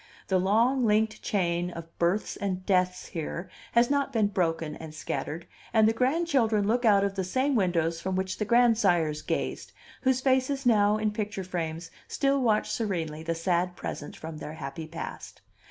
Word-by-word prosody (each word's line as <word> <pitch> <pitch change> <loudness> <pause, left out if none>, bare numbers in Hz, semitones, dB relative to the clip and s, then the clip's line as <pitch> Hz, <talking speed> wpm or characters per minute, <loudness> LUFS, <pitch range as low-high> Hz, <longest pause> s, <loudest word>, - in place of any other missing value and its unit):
The 190 -1 +3
long 230 +8 +3
linked 215 0 +2
chain 175 -3 0
of 165 -1 -9
births 175 +5 +1
and 185 -2 -3
deaths 180 -1 +1
here 170 +2 -5 0.2
has 240 +2 +4
not 280 -1 +1
been 215 -3 +2
broken 165 -5 -1
and 160 -1 -9
scattered, 155 +2 -4 0.3
and 220 -1 +5
the 225 - +3
grandchildren 255 -5 +2
look 240 +3 +1
out 200 -3 +5
of 200 -1 0
the 195 -1 -2
same 260 +10 0
windows 170 -6 +1
from 190 +1 -2
which 190 0 -2
the - - +1
grandsires 200 -10 +3
gazed, - - -3 0.3
whose 260 -1 +2
faces 265 +1 +1
now 210 -3 +4
in 215 -1 0
picture 210 -2 -3
frames 165 -2 -4 0.2
still 275 -1 +1
watch 220 -4 +2
serenely 165 -8 -2
the 165 +1 -2
sad 175 +1 0
present 145 - -6
from 160 0 -7
their 150 - -6
happy 155 +1 -6
past. 165 +1 -8
195 Hz, 170 wpm, -28 LUFS, 170-225 Hz, 0.3 s, and